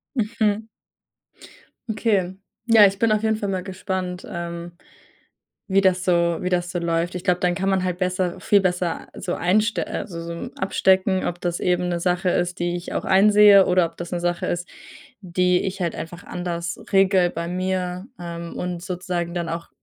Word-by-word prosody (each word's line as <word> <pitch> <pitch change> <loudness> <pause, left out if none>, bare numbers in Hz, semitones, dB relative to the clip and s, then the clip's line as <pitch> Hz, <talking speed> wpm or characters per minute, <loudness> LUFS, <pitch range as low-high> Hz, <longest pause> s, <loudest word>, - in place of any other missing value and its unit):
Mhm. 220 -2 0 1.2
Okay. 205 -4 0 0.3
Ja, 225 -3 +7
ich 195 0 +1
bin 230 -1 +3
auf 215 +1 0
jeden 220 -1 +1
Fall 205 - -3
mal 185 -1 -2
gespannt, 185 -1 -4
ähm, 170 -2 -6 0.9
wie 195 0 +3
das 185 -1 +2
so 170 -2 +2
wie 180 - -1
das 175 -1 0
so 175 - -3
läuft. 170 +1 -1
Ich 180 - -5
glaube, 180 -2 +2
dann 180 -1 +1
kann 195 +1 -2
man 190 -1 +2
halt 180 -1 -1
besser 185 -1 -1
viel 200 +2 +3
besser, 180 -2 -1
äh, - - -10
so 180 -1 -3
einst 215 +6 +1
äh, - - -3
so 170 -2 -6
abstecken, 190 0 +2
ob 175 0 -4
das 175 -1 -2
eben 180 0 +1
'ne 175 -1 -1
Sache 180 +1 +1
ist, 175 0 -1
die 175 0 -1
ich 175 0 -6
auch - - -2
einsehe, 205 0 +7
oder 180 -1 +3
ob 165 - -19
das 175 +1 -7
'ne 175 - -1
Sache 175 0 -1
ist, 175 +1 -3 0.5
die 180 -1 +1
ich 190 0 -4
halt 170 -2 -1
einfach 170 +2 -7
anders 170 -1 -4 0.2
regele 190 -2 +4
bei 170 +1 -4
mir, 185 0 -2
ähm, 170 -1 -7
und 180 -1 -4
sozusagen 180 -2 -3
dann 170 -2 -3
auch 170 +1 -5
180 Hz, 190 wpm, -23 LUFS, 175-190 Hz, 1.2 s, Ja